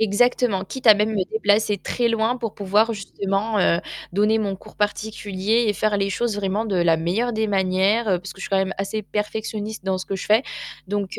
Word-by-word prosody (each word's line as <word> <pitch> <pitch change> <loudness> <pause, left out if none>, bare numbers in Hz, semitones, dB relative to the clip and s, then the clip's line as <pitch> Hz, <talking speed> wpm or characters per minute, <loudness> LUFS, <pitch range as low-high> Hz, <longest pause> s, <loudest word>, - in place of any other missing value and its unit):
Exactement, 220 -1 +2
quitte 260 +6 -7
à, 215 - +10
même, 210 +2 +1
me 200 -4 0
déplacer 210 -1 +2
très 240 +5 -1
loin 230 +1 +1
pour 230 -4 -4
pouvoir 210 +3 +2
justement, 200 +1 -2
heu, 170 -3 +3 0.3
donner 210 +3 +3
mon 200 -3 -1
cours - - -15
particulier 210 +1 -1
et 210 - +3
faire 210 +1 0
les 195 0 0
choses, 220 +2 -1
vraiment, 205 +2 -1
de 200 -4 -1
la 170 -2 +3
meilleure 200 +10 0
des 220 -1 0
manières, 195 +3 +2
heu, 185 -3 +2
parce 185 - -8
que - - -19
je - - -6
suis - - -4
quand 195 - +1
même 190 0 0
assez 215 +2 -2
perfectionniste 210 0 -4
dans 190 -1 0
ce - - -6
que 195 - -3
je 190 - -4
fais. 220 +5 +4 0.4
Donc, 200 0 -3
205 Hz, 220 wpm, -22 LUFS, 195-220 Hz, 0.4 s, à